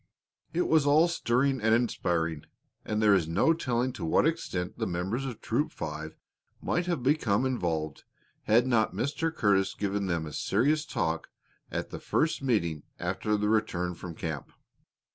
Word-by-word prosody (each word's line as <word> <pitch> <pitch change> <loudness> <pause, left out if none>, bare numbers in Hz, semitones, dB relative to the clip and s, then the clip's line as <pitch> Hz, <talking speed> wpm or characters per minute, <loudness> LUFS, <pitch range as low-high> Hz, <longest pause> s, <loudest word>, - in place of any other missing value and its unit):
It 180 - 0
was 155 -3 +4
all 155 +4 +6
stirring 135 -5 +1
and 110 +1 +4
inspiring, 85 -9 0 0.4
and 110 0 -1
there 105 -1 +6
is 90 -5 +2
no 85 - +3
telling 125 -5 -1
to - - -7
what 80 - +3
extent 95 - -2
the - - 0
members 95 +9 -2
of 125 -5 -6
Troop - - 0
Five 75 +1 -6 0.4
might 175 +1 -1
have 170 -8 -1
become 130 -5 +2
involved 80 - -2 0.4
had 120 +3 +4
not 120 -4 +2
Mr. 160 +5 -1
Curtis 100 -9 +2
given 100 -1 -1
them 85 -3 -1
a 75 - -8
serious 150 - +1
talk 80 - -2 0.4
at - - -4
the - - -6
first 160 -2 0
meeting 85 - 0 0.2
after 95 +4 -1
their 105 0 0
return 90 -5 0
from 85 0 -8
camp. 80 -5 -5
105 Hz, 160 wpm, -29 LUFS, 85-135 Hz, 0.4 s, all